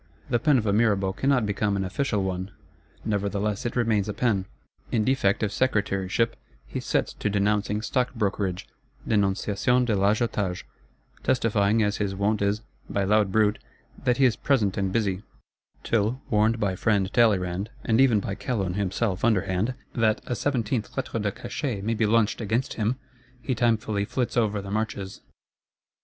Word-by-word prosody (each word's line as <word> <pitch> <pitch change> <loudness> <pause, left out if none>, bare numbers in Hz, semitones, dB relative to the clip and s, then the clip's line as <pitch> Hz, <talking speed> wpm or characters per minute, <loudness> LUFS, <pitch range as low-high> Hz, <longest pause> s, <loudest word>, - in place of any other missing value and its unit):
The 120 - +3
pen 150 0 +4
of 115 - -1
a 100 - +2
Mirabeau 100 -3 +2
cannot 130 +2 +2
become 100 0 0
an 95 - -1
official 105 +1 -1
one; 95 0 -3 0.6
nevertheless 100 +1 -1
it - - -5
remains 110 -4 +1
a 105 - -3
pen. 105 -4 +1 0.5
In 110 - +2
defect 115 -6 +2
of 105 - 0
Secretaryship, 100 -2 0 0.3
he - - -5
sets - - -1
to - - -2
denouncing 105 +1 0
Stock 125 +2 0
brokerage 100 -4 -1 0.4
(Dénonciation 105 +4 +2
de 115 -3 +1
l'Agiotage); 100 -2 0 0.6
testifying, 110 -3 +2
as 105 0 0
his 100 -2 -2
wont 100 +2 0
is, 100 +2 0 0.3
by 100 - 0
loud 105 0 +3
bruit, 105 0 +2 0.4
that 125 -2 +2
he 135 - +5
is 120 -4 +3
present 110 -9 +1
and 95 -2 -1
busy;—till, 105 +3 -3
warned 110 +2 +3
by 100 -3 0
friend 100 -1 +1
Talleyrand, 100 -4 +2 0.2
and 115 +1 +3
even 120 -6 +5
by 100 - -4
Calonne 100 -3 -2
himself 100 0 -1
underhand, 105 +1 +1 0.2
that 110 -2 +2
"a 125 - -2
seventeenth 120 -5 -1
Lettre 115 - -2
de 100 -1 0
Cachet 120 -1 -4
may 115 +2 0
be 110 -1 +1
launched 115 +1 +2
against 115 +4 -1
him," 110 +3 0 0.4
he 125 +2 -2
timefully 110 -4 +1
flits 125 -2 -2
over 105 -4 +1
the 100 - -7
marches. 105 -3 -3
105 Hz, 160 wpm, -26 LUFS, 100-115 Hz, 0.6 s, he